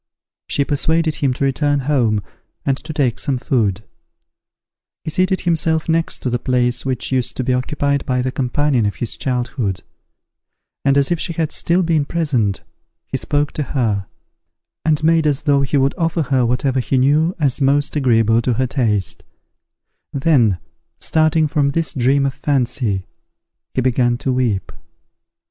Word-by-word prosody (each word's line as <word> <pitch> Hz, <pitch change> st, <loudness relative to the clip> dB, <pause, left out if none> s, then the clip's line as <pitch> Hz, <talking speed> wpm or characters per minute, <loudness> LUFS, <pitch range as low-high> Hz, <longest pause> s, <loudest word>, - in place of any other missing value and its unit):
She 140 Hz, -, 0 dB
persuaded 160 Hz, +3 st, +1 dB
him 140 Hz, -2 st, +1 dB
to -, -, -3 dB
return 145 Hz, +1 st, +1 dB
home, 120 Hz, -7 st, +1 dB, 0.4 s
and 135 Hz, -, +2 dB
to 150 Hz, -, -8 dB
take 130 Hz, -5 st, 0 dB
some 140 Hz, -3 st, -1 dB
food. 110 Hz, -6 st, 0 dB, 1.2 s
He 155 Hz, -, -4 dB
seated 185 Hz, +2 st, +1 dB
himself 160 Hz, -2 st, 0 dB
next 165 Hz, 0 st, 0 dB
to 125 Hz, -, -1 dB
the 120 Hz, -, 0 dB
place 125 Hz, -1 st, 0 dB
which 130 Hz, -2 st, -3 dB
used 125 Hz, -2 st, 0 dB
to 130 Hz, -, -1 dB
be 130 Hz, +1 st, +1 dB
occupied 140 Hz, +2 st, -1 dB
by 125 Hz, -1 st, 0 dB
the 130 Hz, -, -1 dB
companion 130 Hz, -2 st, +1 dB
of 100 Hz, -, -3 dB
his 120 Hz, -, -3 dB
childhood; 120 Hz, -6 st, -2 dB, 1.0 s
and, 140 Hz, 0 st, +3 dB
as 140 Hz, +3 st, +2 dB
if 170 Hz, -, +1 dB
she 170 Hz, -, -2 dB
had 160 Hz, -1 st, -1 dB
still 175 Hz, +2 st, +1 dB
been 160 Hz, -4 st, +1 dB
present, 135 Hz, -, -1 dB, 0.4 s
he -, -, -5 dB
spoke 145 Hz, 0 st, 0 dB
to 150 Hz, -, -2 dB
her, 105 Hz, -6 st, 0 dB, 0.8 s
and 155 Hz, 0 st, +1 dB
made 160 Hz, -1 st, +3 dB
as 145 Hz, -1 st, 0 dB
though 145 Hz, -2 st, +3 dB
he 140 Hz, +1 st, 0 dB
would 135 Hz, 0 st, +2 dB
offer 165 Hz, 0 st, +1 dB
her 130 Hz, -3 st, +1 dB
whatever 130 Hz, +2 st, 0 dB
he 130 Hz, +1 st, 0 dB
knew 150 Hz, +7 st, +3 dB
as 140 Hz, -3 st, +1 dB
most 140 Hz, +2 st, +2 dB
agreeable 115 Hz, -5 st, +3 dB
to 125 Hz, +1 st, 0 dB
her 130 Hz, +3 st, 0 dB
taste: 110 Hz, -7 st, 0 dB, 0.9 s
then, 135 Hz, -, +3 dB, 0.4 s
starting 155 Hz, 0 st, +2 dB
from 145 Hz, -1 st, +1 dB
this 160 Hz, -1 st, -1 dB
dream 135 Hz, +2 st, +2 dB
of 135 Hz, -, -1 dB
fancy, 125 Hz, -8 st, -1 dB, 0.7 s
he 130 Hz, -, +2 dB
began 120 Hz, -1 st, +1 dB
to 130 Hz, +1 st, -1 dB
weep. 120 Hz, -7 st, -1 dB
135 Hz, 160 wpm, -19 LUFS, 125-150 Hz, 1.2 s, and